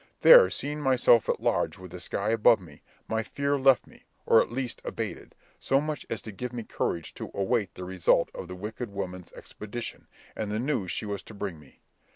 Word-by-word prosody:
There - - +9
seeing 150 +1 -4
myself 125 -4 +4
at - - 0
large - - 0
with 90 -2 -11
the 90 - -8
sky 100 +4 -2
above 115 0 +5
me, 80 -6 -15 0.3
my 110 0 0
fear 140 +5 -1
left 135 -1 +5
me, - - -20 0.2
or - - +6
at - - -3
least 125 0 -4
abated, - - -5 0.2
so 135 - +2
much 150 -1 -4
as 115 - -4
to 110 - -7
give 125 +5 -5
me 120 -2 -5
courage 85 -5 -3
to - - -7
await 100 +1 0
the 90 - -7
result 95 -1 +2
of - - -7
that 90 - -7
wicked 110 +5 -6
woman's 90 -2 -6
expedition, 110 +3 -8 0.3
and 105 -1 -3
the 105 - -1
news 120 -6 -1
she - - -3
was 100 -2 -4
to 110 - -13
bring 100 -5 -5
me. 70 -3 -20
110 Hz, 205 wpm, -28 LUFS, 95-125 Hz, 0.3 s, There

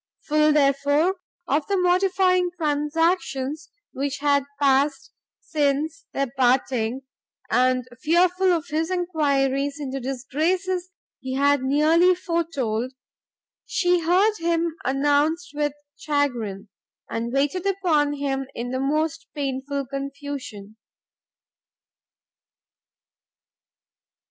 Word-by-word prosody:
Full, 305 0 +3
therefore, 285 +5 +2 0.3
of 290 +1 0
the 400 - +1
mortifying 365 0 +3
transactions 300 -1 -1 0.2
which 280 +1 -3
had 280 -1 +2
passed 275 0 +2 0.3
since 300 +2 -1
their 275 -3 -2
parting, 250 -1 +1 0.5
and 255 +1 +2
fearful 360 +4 +3
of 340 -1 -1
his 320 +2 -1
enquiries 285 -6 0
into 270 -2 -4
disgraces 330 +9 -1 0.3
he 260 0 -4
had 285 0 +3
nearly 315 +7 +4
foretold, 285 - -2 0.7
she 360 -2 +2
heard 375 +6 +3
him 335 -1 0
announced 290 +5 +1
with 295 -1 -1 0.2
chagrin, 240 -9 -2 0.4
and 230 +1 -3
waited 290 +8 0
upon 335 -7 +1
him 270 -2 -2
in 240 +1 -4
the 260 - -2
most 305 +4 -1
painful 275 0 -3
confusion. 275 -6 -7
290 Hz, 95 wpm, -24 LUFS, 270-335 Hz, 0.7 s, nearly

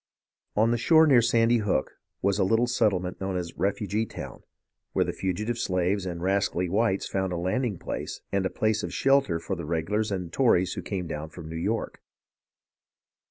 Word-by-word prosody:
On 110 +2 +3
the 120 - +1
shore 160 +5 +6
near 135 -6 +6
Sandy 115 +1 +3
Hook 100 -11 0 0.3
was 100 +1 +2
a - - +4
little 115 +5 +3
settlement 100 -8 0
known 95 -1 -2
as 85 -2 -5
Refugee 100 +3 -1
Town, - - -8 0.5
where - - +2
the - - -3
fugitive 105 +6 -2
slaves 95 0 0
and 85 -1 -5
rascally 95 -1 +1
whites 100 +1 +1
found 95 -1 -1
a 90 - -2
landing 100 +5 -1
place - - -5
and 100 -1 +1
a 95 - 0
place 110 +2 0
of - - -4
shelter 135 -11 +2
for 95 +3 -3
the 85 - -6
regulars 100 +7 -1
and 90 -3 -4
Tories 95 -9 +3
who - - -5
came 95 -3 -4
down 80 -1 -5
from 80 -1 -10
New 80 - -7
York. 105 +8 -2
100 Hz, 185 wpm, -27 LUFS, 90-115 Hz, 0.5 s, shore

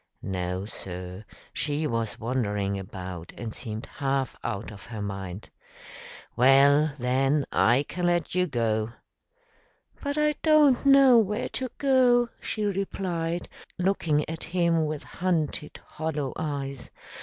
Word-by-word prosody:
"No, 90 0 -3
sir; 90 -1 -7 0.3
she 150 +1 -1
was 115 -5 -2
wandering 105 -5 -1
about 90 -3 -7
and 115 -3 -5
seemed 110 -2 -5
half 135 -2 -2
out 110 -2 -4
of 100 -2 -12
her 115 -2 -6
mind." 95 -1 -6 0.8
"Well, 140 +4 +5
then, 135 +3 +1
I 125 +4 +4
can 180 0 -1
let 175 -2 +1
you 180 0 +2
go." 115 -4 0 1.1
"But 285 0 -2
I 300 0 +3
don't 295 -4 +5
know 275 -3 +8
where 210 0 0
to 255 -1 -3
go," 250 -3 +4
she 215 -1 -2
replied, 180 -4 -2 0.3
looking 175 -5 +1
at 165 +1 -5
him 170 -3 +1
with 150 -1 -4
hunted, 160 -4 -2
hollow 150 -4 -3
eyes. 140 -4 -4
145 Hz, 125 wpm, -27 LUFS, 110-180 Hz, 1.1 s, know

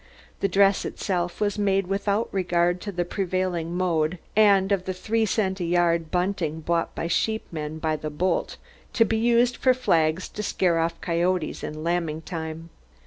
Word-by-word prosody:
The 195 - +1
dress 195 +1 +3
itself 175 -3 -2
was 210 0 0
made 195 -1 +2
without 200 +3 0
regard 175 -1 +1
to 205 - -5
the 175 -2 -2
prevailing 180 -2 -2
mode 170 -2 +1 0.2
and 200 -2 +5
of 190 -2 +1
the 185 - -3
three 220 +4 0
cent 190 -2 0
a - - -2
yard 170 -1 +1
bunting 180 -3 -1
bought 170 +1 -1
by - - -3
sheepmen 165 -5 -2
by 155 -1 -1
the 155 - -5
bolt 170 +4 -1 0.4
to 225 - +4
be 225 +1 0
used 240 +2 +3
for 255 -1 +3
flags 165 -7 +1
to 210 - -6
scare 180 -5 +1
off 165 +1 -1
coyotes 175 -1 -1
in 155 +1 -5
lambing 165 -2 -1
time. 165 -1 -6
180 Hz, 170 wpm, -25 LUFS, 165-200 Hz, 0.4 s, and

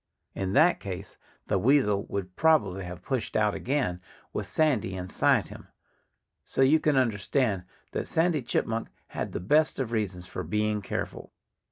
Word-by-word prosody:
In 95 0 -2
that 175 +8 +5
case 95 -1 -7 0.3
the - - +1
weasel 105 -4 +3
would 95 -2 -4
probably 105 - +3
have 90 0 -8
pushed 130 -5 -2
out 105 -1 +2
again, 100 -4 -1 0.3
with - - -3
Sandy 120 -11 +1
inside 90 0 +1
him. - - -11 0.8
So 135 - +1
you 150 +4 +5
can 150 -3 +2
understand 110 -3 +1 0.3
that - - -3
Sandy 165 -2 +2
Chipmunk 115 -1 -1 0.2
had - - -4
the - - -3
best 150 - +3
of 130 -4 -2
reasons 100 -6 -2
for 90 - -5
being 105 +4 0
careful. - - -5
105 Hz, 155 wpm, -28 LUFS, 95-135 Hz, 0.8 s, that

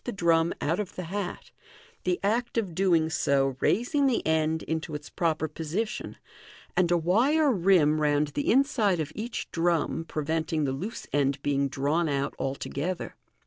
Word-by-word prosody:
3ii - - -46
the 245 - -2
drum 170 -2 +2
out 165 +5 0
of 205 -3 -4
the 185 - -4
hat, 185 +2 -5 0.5
the 180 -1 +1
act 235 +4 0
of 200 -7 -1
doing 170 -3 +3
so 135 -4 +1
raising 275 +5 +2
the 255 - 0
end 160 0 +1
into 160 -1 -3
its 150 0 -8
proper 160 -2 0
position, 165 +8 -4 0.6
and 180 -2 +3
a 175 - +4
wire 260 - +3
rim 170 -7 +3
round 150 0 +2
the 145 0 -2
inside 235 - +3
of 155 -1 -3
each 225 +2 -5
drum 165 -1 0
pre 155 -2 -4
venting 160 0 0
the 135 - 0
loose 185 - -5
end 140 -1 +1
being 140 -1 +1
drawn 145 +5 0
out 140 -1 -1
altogether. 140 +6 -3
165 Hz, 170 wpm, -27 LUFS, 150-195 Hz, 0.6 s, a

